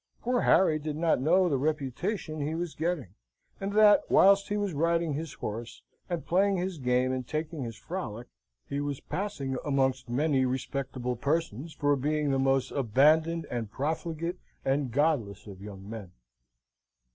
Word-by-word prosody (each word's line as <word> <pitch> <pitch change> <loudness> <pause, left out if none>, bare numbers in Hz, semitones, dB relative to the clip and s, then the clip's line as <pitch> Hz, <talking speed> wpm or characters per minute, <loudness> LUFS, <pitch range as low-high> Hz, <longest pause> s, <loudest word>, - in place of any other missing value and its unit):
Poor 245 0 +1
Harry 160 -5 +4
did 150 0 -4
not 160 -4 +2
know 180 +6 +4
the 140 -6 +1
reputation 155 - -2
he 150 +3 -2
was 170 -1 -3
getting; 160 - -2 0.5
and 195 +1 -3
that, 210 -1 +7
whilst 200 +1 +5
he 205 - 0
was 205 -3 -1
riding 165 +1 +1
his 155 +1 -4
horse 115 +2 -6 0.3
and 175 -2 -3
playing 195 +2 +2
his 180 -2 -3
game 125 0 +2
and 130 -2 -3
taking 155 0 -3
his 115 -3 -5
frolic, 120 - -5 0.4
he 140 0 -2
was 145 -2 -3
passing 150 -10 -3
amongst 135 -3 0
many 135 +2 +2
respectable 130 -1 -2
persons 145 +2 -1
for 145 -1 +2
being 150 +1 0
the 135 - +1
most 135 -1 +2
abandoned 155 +6 +3
and 115 -3 -3
profligate 160 +5 -3 0.3
and 135 0 +1
godless 125 - 0
of 100 -3 -10
young 100 -1 -9
men. 105 -4 -7
145 Hz, 160 wpm, -29 LUFS, 130-170 Hz, 0.5 s, that